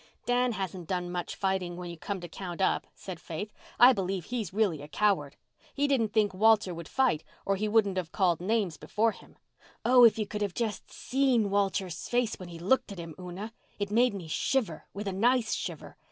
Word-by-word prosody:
"Dan 245 Hz, 0 st, +2 dB
hasn't 185 Hz, -4 st, -5 dB
done 180 Hz, -2 st, -2 dB
much 175 Hz, -1 st, -4 dB
fighting 190 Hz, -3 st, -1 dB
when 175 Hz, -1 st, -6 dB
you -, -, -7 dB
come 195 Hz, +4 st, -4 dB
to 175 Hz, -, -6 dB
count 175 Hz, +1 st, -7 dB
up," 190 Hz, -, +1 dB
said 185 Hz, -4 st, -8 dB
Faith. 175 Hz, +5 st, -6 dB, 0.3 s
"I 250 Hz, +2 st, +9 dB
believe 190 Hz, -4 st, -2 dB
he's 235 Hz, -4 st, -3 dB
really 195 Hz, -7 st, +1 dB
a 145 Hz, -, -8 dB
coward. 165 Hz, -5 st, +1 dB, 0.4 s
He 285 Hz, +1 st, +2 dB
didn't 235 Hz, -7 st, +1 dB
think 210 Hz, -2 st, +2 dB
Walter 215 Hz, -1 st, +4 dB
would 170 Hz, -1 st, -7 dB
fight, 255 Hz, -13 st, +1 dB, 0.2 s
or 195 Hz, -, +2 dB
he 210 Hz, +2 st, -1 dB
wouldn't 210 Hz, -3 st, +2 dB
have 170 Hz, -3 st, -3 dB
called 175 Hz, -5 st, +2 dB
names 195 Hz, -4 st, 0 dB
before 215 Hz, +9 st, +1 dB
him. -, -, -16 dB, 0.5 s
Oh, 250 Hz, 0 st, +7 dB
if 230 Hz, -2 st, +7 dB
you 215 Hz, -, 0 dB
could 210 Hz, +1 st, -5 dB
just 225 Hz, -3 st, -1 dB
have -, -, -23 dB
seen 250 Hz, -6 st, +1 dB
Walter's 195 Hz, -3 st, -1 dB
face 240 Hz, -3 st, 0 dB
when 180 Hz, -2 st, -8 dB
he 170 Hz, -, -8 dB
looked 200 Hz, +7 st, +1 dB
at 200 Hz, -, -7 dB
him, 165 Hz, -2 st, -7 dB
Una! 185 Hz, +5 st, -7 dB, 0.2 s
It 205 Hz, 0 st, -3 dB
made 235 Hz, 0 st, +3 dB
me 180 Hz, -4 st, -6 dB
shiver—with 200 Hz, -, -2 dB
a 195 Hz, -, -1 dB
nice 235 Hz, +4 st, +2 dB
shiver. -, -, -5 dB
200 Hz, 205 wpm, -29 LUFS, 175-225 Hz, 0.5 s, I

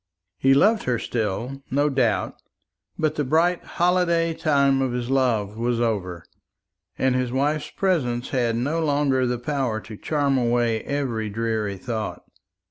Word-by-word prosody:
He 135 Hz, 0 st, +4 dB
loved 215 Hz, +9 st, +3 dB
her 125 Hz, -2 st, +1 dB
still, 115 Hz, +5 st, -3 dB
no 145 Hz, +2 st, +2 dB
doubt; 130 Hz, -7 st, 0 dB, 0.6 s
but 155 Hz, -1 st, +1 dB
the 150 Hz, -, -1 dB
bright 165 Hz, +6 st, +2 dB
holiday 170 Hz, -2 st, +1 dB
time 140 Hz, -4 st, +2 dB
of 130 Hz, -2 st, 0 dB
his 125 Hz, +1 st, -3 dB
love 115 Hz, -6 st, +1 dB
was 120 Hz, 0 st, 0 dB
over, 95 Hz, -8 st, -2 dB, 0.7 s
and 130 Hz, -1 st, +2 dB
his 125 Hz, -1 st, 0 dB
wife's 145 Hz, +3 st, 0 dB
presence 130 Hz, -11 st, -1 dB
had 120 Hz, -3 st, 0 dB
no 140 Hz, +8 st, -1 dB
longer 140 Hz, -4 st, +2 dB
the 125 Hz, 0 st, -1 dB
power 125 Hz, -3 st, -2 dB
to 110 Hz, -, -10 dB
charm 140 Hz, -1 st, 0 dB
away 120 Hz, -2 st, +1 dB
every 125 Hz, -7 st, -2 dB
dreary 110 Hz, -2 st, -2 dB
thought. 110 Hz, +1 st, -4 dB
130 Hz, 145 wpm, -24 LUFS, 115-145 Hz, 0.7 s, He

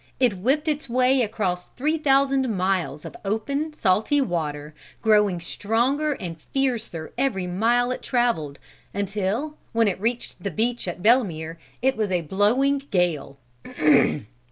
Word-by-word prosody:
It 240 Hz, -8 st, +2 dB
whipped 280 Hz, -, +1 dB
its 300 Hz, -3 st, -1 dB
way 255 Hz, +2 st, +3 dB
across 200 Hz, -5 st, -2 dB
three 310 Hz, +4 st, 0 dB
thousand 275 Hz, -2 st, +3 dB
miles 185 Hz, -8 st, -1 dB
of -, -, -8 dB
open, 275 Hz, +10 st, -2 dB
salty 220 Hz, +4 st, +2 dB
water, 155 Hz, -, -2 dB, 0.3 s
growing 210 Hz, -5 st, +4 dB
stronger 240 Hz, -, 0 dB
and 165 Hz, -, -7 dB
fiercer 235 Hz, -, -2 dB
every 215 Hz, -9 st, 0 dB
mile 235 Hz, +7 st, +1 dB
it 255 Hz, -, -4 dB
traveled, 230 Hz, -, 0 dB, 0.4 s
until, 205 Hz, +9 st, -2 dB, 0.2 s
when 225 Hz, -1 st, +3 dB
it 190 Hz, -1 st, -2 dB
reached 235 Hz, +2 st, -2 dB
the 200 Hz, -, -2 dB
beach 235 Hz, +5 st, -1 dB
at 175 Hz, +1 st, -5 dB
Belemere, 170 Hz, -9 st, +2 dB, 0.3 s
it 265 Hz, 0 st, +3 dB
was 215 Hz, -2 st, 0 dB
blowing 220 Hz, -, +2 dB
a -, -, -21 dB
gale. 170 Hz, -, -1 dB
220 Hz, 135 wpm, -24 LUFS, 180-265 Hz, 0.4 s, growing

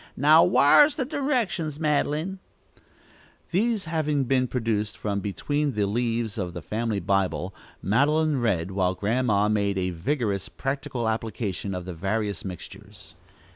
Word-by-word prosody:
"Now 155 Hz, +4 st, +6 dB
whar's 235 Hz, -, +6 dB
the 265 Hz, -, -1 dB
directions, 235 Hz, -, -1 dB
Madeline?" 155 Hz, +4 st, 0 dB, 1.1 s
These 215 Hz, +3 st, +1 dB
having 155 Hz, -3 st, 0 dB
been 130 Hz, 0 st, +1 dB
produced 110 Hz, -4 st, -2 dB
from 100 Hz, -1 st, -2 dB
between 145 Hz, +9 st, -1 dB
the 105 Hz, -2 st, +1 dB
leaves 115 Hz, +1 st, -1 dB
of 90 Hz, -3 st, -3 dB
the 85 Hz, -, -6 dB
family 110 Hz, +3 st, -2 dB
Bible, 95 Hz, -1 st, -1 dB, 0.3 s
Madeline 145 Hz, -, +2 dB
read, 95 Hz, -6 st, 0 dB
while 95 Hz, -1 st, 0 dB
Grandma 105 Hz, +1 st, +1 dB
made 100 Hz, -2 st, 0 dB
a 95 Hz, -1 st, -1 dB
vigorous 100 Hz, -, -2 dB
practical 135 Hz, -3 st, -3 dB
application 110 Hz, -3 st, -3 dB
of 90 Hz, -1 st, -5 dB
the 90 Hz, -, -5 dB
various 100 Hz, +4 st, -2 dB
mixtures. 90 Hz, -5 st, -10 dB
115 Hz, 135 wpm, -25 LUFS, 100-150 Hz, 1.1 s, Now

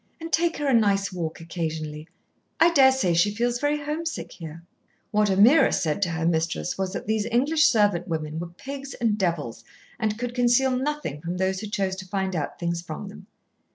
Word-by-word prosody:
"And 330 Hz, 0 st, -8 dB
take 335 Hz, 0 st, +2 dB
her 295 Hz, -, -3 dB
a 270 Hz, -, +3 dB
nice 200 Hz, -4 st, +2 dB
walk 165 Hz, -3 st, -4 dB
occasionally. 160 Hz, -2 st, -5 dB, 0.5 s
I 340 Hz, -, +6 dB
daresay 265 Hz, -, +4 dB
she 205 Hz, +5 st, +2 dB
feels 240 Hz, +2 st, 0 dB
very 290 Hz, +1 st, 0 dB
homesick 320 Hz, +3 st, -4 dB
here." 165 Hz, -1 st, -9 dB, 0.5 s
What 210 Hz, -1 st, +2 dB
Ameerah 215 Hz, +11 st, +6 dB
said 155 Hz, +3 st, 0 dB
to 185 Hz, -, +2 dB
her 165 Hz, 0 st, -2 dB
mistress 160 Hz, -, 0 dB
was 190 Hz, -1 st, -2 dB
that -, -, -5 dB
these 220 Hz, 0 st, 0 dB
English 280 Hz, +7 st, +3 dB
servant 205 Hz, -6 st, +3 dB
women 155 Hz, -2 st, -3 dB
were 175 Hz, -, -4 dB
pigs 275 Hz, +10 st, -8 dB
and 225 Hz, -3 st, +1 dB
devils, 160 Hz, -, -2 dB, 0.4 s
and 215 Hz, -2 st, -1 dB
could 245 Hz, +1 st, -4 dB
conceal 245 Hz, +1 st, +3 dB
nothing 265 Hz, -, -3 dB
from 175 Hz, +2 st, -4 dB
those 190 Hz, 0 st, 0 dB
who 215 Hz, -, -5 dB
chose 195 Hz, -2 st, -1 dB
to 190 Hz, 0 st, -8 dB
find 190 Hz, -1 st, -2 dB
out 150 Hz, -3 st, -3 dB
things 170 Hz, -1 st, -2 dB
from 175 Hz, +4 st, -7 dB
them. 195 Hz, -1 st, -13 dB
195 Hz, 190 wpm, -25 LUFS, 170-245 Hz, 0.5 s, I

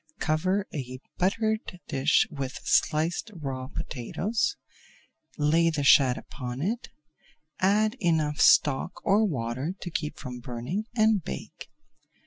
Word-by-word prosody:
Cover 185 Hz, +6 st, 0 dB
a 130 Hz, -3 st, -5 dB, 0.2 s
buttered 215 Hz, +4 st, +1 dB
baking 180 Hz, -, -9 dB
dish 135 Hz, +3 st, +3 dB
with 135 Hz, -3 st, -5 dB
sliced 160 Hz, +8 st, +1 dB
raw 130 Hz, -3 st, -4 dB
potatoes, 210 Hz, -, -2 dB, 0.8 s
lay 160 Hz, +3 st, +3 dB
the 155 Hz, -3 st, -1 dB
shad 135 Hz, -2 st, +6 dB
upon 125 Hz, -2 st, -7 dB
it, 220 Hz, -, -2 dB, 0.7 s
add 215 Hz, +4 st, +3 dB
enough 160 Hz, -5 st, +1 dB
stock 135 Hz, -3 st, +4 dB
or 210 Hz, +1 st, +4 dB
water 130 Hz, -, -2 dB
to 175 Hz, -, -6 dB
keep 150 Hz, -2 st, -3 dB
from 125 Hz, -3 st, -7 dB
burning 125 Hz, -, -4 dB
and 215 Hz, -4 st, +3 dB
bake. 65 Hz, -, -7 dB
155 Hz, 120 wpm, -27 LUFS, 130-195 Hz, 0.8 s, shad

